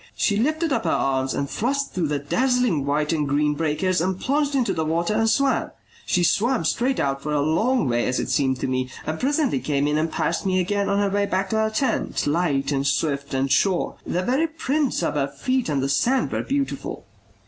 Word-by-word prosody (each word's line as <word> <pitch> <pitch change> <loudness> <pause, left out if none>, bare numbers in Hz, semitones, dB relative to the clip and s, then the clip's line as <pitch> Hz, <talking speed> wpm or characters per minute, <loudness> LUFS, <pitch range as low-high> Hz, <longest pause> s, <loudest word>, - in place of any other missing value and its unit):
She 205 - +1
lifted 310 +6 +1
up 225 - 0
her - - +1
arms 135 -1 0
and 140 - -1
thrust 275 - -2
through 175 -4 0
the 145 0 -1
dazzling 240 - +1
white 150 +2 +1
and 150 -3 -1
green 150 +1 +2
breakers 165 +4 0
and 185 +1 -1
plunged 285 +1 0
into 255 -3 +1
the 160 - -1
water 170 +5 0
and 225 +1 +2
swam; 275 +4 +1 0.4
she 180 - +2
swam 230 - +2
straight 260 +2 0
out 135 0 -1
for 150 - -4
a 150 - +1
long 165 - +1
way 120 -1 +1
as 125 - 0
it - - -2
seemed 130 -2 +1
to - - -1
me, 130 0 -1 0.2
and 160 0 -3
presently 285 - +1
came 140 +2 0
in 150 +1 +1
and 160 +1 -1
passed 170 - -1
me 185 -2 +1
again 200 +2 0
on 200 - +1
her 200 -1 +1
way 200 0 +1
back 190 0 -1
to 220 - +1
her 220 0 +2
tent, 220 +5 -1
light 145 -3 0
and 140 0 0
swift 140 0 -1
and 135 0 0
sure. 190 -3 +2
The 180 - -2
very 270 - +1
prints 300 - -1
of - - 0
her 140 -2 0
feet 235 - -1
on 140 -3 0
the 135 - 0
sand 245 - +1
were - - -1
beautiful. 275 0 -3
180 Hz, 225 wpm, -23 LUFS, -, 0.4 s, green